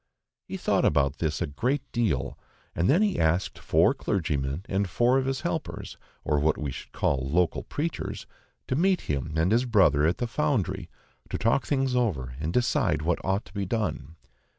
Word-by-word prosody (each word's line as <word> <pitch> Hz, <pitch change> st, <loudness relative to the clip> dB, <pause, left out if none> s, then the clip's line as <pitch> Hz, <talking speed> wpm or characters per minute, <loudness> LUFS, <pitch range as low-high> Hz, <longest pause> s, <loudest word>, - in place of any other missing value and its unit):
He -, -, -5 dB
thought -, -, +1 dB
about 70 Hz, -1 st, +2 dB
this 80 Hz, +1 st, -1 dB
a -, -, 0 dB
great 125 Hz, -, -1 dB
deal, 110 Hz, -, 0 dB, 0.4 s
and 85 Hz, +3 st, +1 dB
then 175 Hz, +9 st, +5 dB
he 205 Hz, -3 st, 0 dB
asked 80 Hz, +3 st, +1 dB
four -, -, +3 dB
clergymen 75 Hz, -2 st, -2 dB
and 100 Hz, 0 st, 0 dB
four 120 Hz, +7 st, +3 dB
of 130 Hz, -, -2 dB
his 135 Hz, -1 st, -1 dB
helpers, -, -, -4 dB, 0.3 s
or 75 Hz, 0 st, +1 dB
what 75 Hz, +2 st, +2 dB
we 75 Hz, -3 st, -3 dB
should -, -, -9 dB
call 65 Hz, -1 st, 0 dB
local 85 Hz, +2 st, +1 dB
preachers, 160 Hz, +3 st, -4 dB, 0.4 s
to 130 Hz, -, 0 dB
meet 185 Hz, +5 st, +2 dB
him 70 Hz, 0 st, -3 dB
and 80 Hz, +4 st, +2 dB
his 120 Hz, +3 st, +3 dB
brother 85 Hz, -, +4 dB
at 85 Hz, -, +1 dB
the 120 Hz, -, -1 dB
Foundry, 105 Hz, -, -1 dB, 0.4 s
to -, -, -2 dB
talk 115 Hz, +4 st, +1 dB
things 135 Hz, -3 st, +1 dB
over 75 Hz, -, 0 dB
and 80 Hz, +2 st, -2 dB
decide 90 Hz, -9 st, +1 dB
what 85 Hz, +1 st, 0 dB
ought 95 Hz, +2 st, 0 dB
to -, -, -17 dB
be 100 Hz, -2 st, -3 dB
done. 105 Hz, -6 st, -2 dB
95 Hz, 185 wpm, -27 LUFS, 75-125 Hz, 0.4 s, then